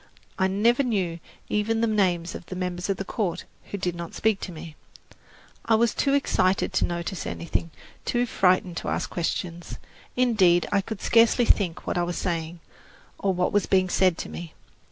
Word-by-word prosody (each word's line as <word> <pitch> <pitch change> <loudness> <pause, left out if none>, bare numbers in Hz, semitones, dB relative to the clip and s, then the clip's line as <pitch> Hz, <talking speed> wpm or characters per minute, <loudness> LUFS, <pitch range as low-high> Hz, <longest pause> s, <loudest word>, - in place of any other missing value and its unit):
I 190 - +3
never 225 +7 +3
knew 190 -10 -1 0.3
even 220 +2 0
the - - +3
names 185 -6 +1
of 175 - -9
the 185 - -6
members 180 0 -3
of 195 - 0
the 195 - -4
"court" 190 -3 -2 0.2
who 200 - -5
did 180 -2 -2
not 170 -1 -7
speak 220 -3 +1
to - - -6
me. 160 -1 -9 0.9
I 225 - +4
was 230 +1 +2
too 275 -1 +2
excited 190 -9 +1
to - - +2
notice 175 +2 -4
anything, 170 0 -3 0.3
too 240 0 +1
frightened 185 -5 +2
to - - -4
ask - - -2
questions. 175 0 -3 0.4
Indeed, 195 -9 +4
I 200 - +3
could 215 +1 -7
scarcely 230 +1 +4
think 180 -7 +1
what - - -1
I - - +2
was 175 0 -3
saying, 170 -1 -3 0.6
or 195 - +1
what 180 -1 0
was 205 - +2
being 185 -1 +3
said 185 -2 +3
to - - -5
me. 170 -2 -8
185 Hz, 185 wpm, -25 LUFS, 175-215 Hz, 0.9 s, I